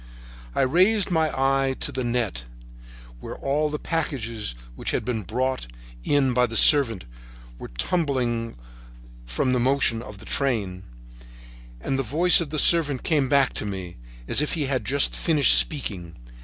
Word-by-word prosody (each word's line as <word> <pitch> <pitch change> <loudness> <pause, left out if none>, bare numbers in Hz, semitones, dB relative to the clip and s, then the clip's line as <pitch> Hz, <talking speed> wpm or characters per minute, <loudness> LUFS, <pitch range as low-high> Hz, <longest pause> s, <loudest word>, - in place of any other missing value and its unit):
I - - +1
raised 185 +9 +2
my 160 -2 +2
eye 135 0 0
to - - -2
the 130 - -3
net, 120 - -2 0.7
where - - -8
all 150 +2 -1
the 150 - -3
packages 115 - -3 0.2
which - - -4
had - - -2
been 115 -3 -2
brought 125 - -3 0.4
in 135 -3 +1
by 125 0 +2
the 115 -1 -3
servant 120 - +4 0.5
were - - -8
trembling 120 - -2 0.7
from 65 - -1
the 125 - +1
motion 125 -2 +1
of 105 -3 -10
the - - -13
train, 105 -10 -1 1.0
and 135 - -2
the - - +2
voice 160 +9 +3
of 160 - -4
the 155 - -4
servant 150 -4 +3
came 145 -5 +1
back 140 -2 +3
to - - -4
me, 95 -3 -7 0.3
as - - +3
if 150 - -2
he 155 -3 -1
had 135 -1 -2
just 140 +3 +1
finished 155 -5 +4
speaking. 95 - -1
130 Hz, 160 wpm, -24 LUFS, 115-145 Hz, 1.0 s, servant